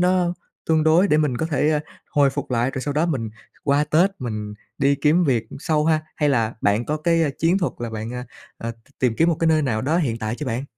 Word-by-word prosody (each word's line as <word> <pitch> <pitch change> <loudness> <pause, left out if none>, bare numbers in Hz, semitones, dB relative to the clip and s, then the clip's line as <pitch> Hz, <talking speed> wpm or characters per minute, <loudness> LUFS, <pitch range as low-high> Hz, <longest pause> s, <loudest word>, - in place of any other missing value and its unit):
nó 180 -1 +2 0.3
tương 160 -1 +3
đối 170 +5 +4
để 150 - +4
mình 150 -5 +1
có 160 - -1
thể, 150 -1 +1
a, 150 -1 +1 0.3
hồi 140 -2 +3
phục 140 -1 -5
lại, 125 +1 +1
rồi 130 - -5
sau 145 +1 -3
đó 155 +3 +2
mình 120 -9 -2 0.3
qua 145 +1 +3
Tết 165 +6 +3
mình 105 -3 -5 0.2
đi 140 +1 +3
kiếm 150 +5 +3
việc 125 -6 +1
sau 155 -1 0
ha? 160 -1 +3 0.2
Hay 150 -1 +2
là 115 -4 +1
bạn 105 +4 +1
có 150 - -1
cái, 165 +1 +2
a, 150 - +2
chiến 170 +4 +2
thuật 175 - -1
là 120 -1 -4
bạn, 110 +2 -5
a, 125 0 -5 0.3
a, 115 0 -4 0.3
tìm 125 -3 +1
kiếm 165 +1 +3
một 165 - +1
cái 165 - +3
nơi 155 -1 +3
nào 110 -5 -1
đó 155 +5 +1
hiện 120 -10 0
tại 110 +1 -3
chưa 145 +1 -6
bạn? 125 +3 -2
145 Hz, 255 wpm, -22 LUFS, 120-160 Hz, 0.3 s, đối